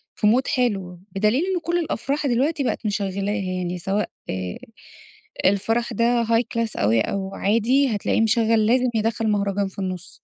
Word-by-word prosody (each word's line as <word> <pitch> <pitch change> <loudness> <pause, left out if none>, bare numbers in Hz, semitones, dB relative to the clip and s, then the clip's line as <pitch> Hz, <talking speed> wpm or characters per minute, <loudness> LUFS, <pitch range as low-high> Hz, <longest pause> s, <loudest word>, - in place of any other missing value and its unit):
في 210 - +1
Mood 250 +4 +3
حلو، 195 - -1
بدليل 215 - +2
إن 375 -2 0
كل 340 +2 0
الأفراح 285 -2 -2
دلوقتي 275 +5 +1
بقِت 245 - -2
مشغّلاها 200 -1 -1
يعني 180 -1 -3
سواء 195 +4 -1 0.2
آآ، 90 -1 -3 0.9
الفرح 225 +5 +1
ده 235 +2 +2
high 230 +1 +3
class 230 -1 -1
أوي، 110 +2 +3
أو 195 - -3
عادي 230 +5 +2
هتلاقيه 205 +2 0
مشغّل 225 -1 +3
لازم 250 +2 +3
يدخّل 225 0 0
مهرجان 200 -1 0
في 190 - -10
النُص. 185 -2 -5
220 Hz, 155 wpm, -23 LUFS, 195-240 Hz, 0.9 s, Mood